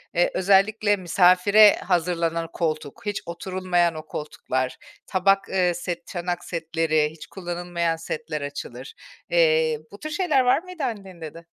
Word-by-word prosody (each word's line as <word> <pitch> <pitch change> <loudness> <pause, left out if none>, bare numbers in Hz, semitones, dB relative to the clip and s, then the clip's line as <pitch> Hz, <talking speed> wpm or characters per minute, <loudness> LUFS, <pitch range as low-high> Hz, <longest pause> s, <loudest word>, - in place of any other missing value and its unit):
Eee, 175 - +3
özellikle 205 +2 +3
misafire 185 +3 +5
hazırlanan 170 -2 -1
koltuk, 155 +1 -3
hiç 205 -1 -2
oturulmayan 175 -1 -1
o 155 0 -7
koltuklar, 130 -4 -3 0.3
tabak, 195 +1 +2
ııı, 180 -2 +1
set, 175 0 -5
çanak 175 -1 -4
setleri, 160 -2 0
hiç 160 - -12
kullanılmayan 175 -2 -3
setler 155 -2 -5
açılır. 140 -2 -7 0.4
Eee, 160 -2 +3
bu 200 - -12
tür 310 - -6
şeyler 310 -4 +2
var 260 +6 +3
mıydı 365 -3 -7
annende 190 -8 -5
de? 165 0 -13
175 Hz, 135 wpm, -24 LUFS, 165-195 Hz, 0.4 s, misafire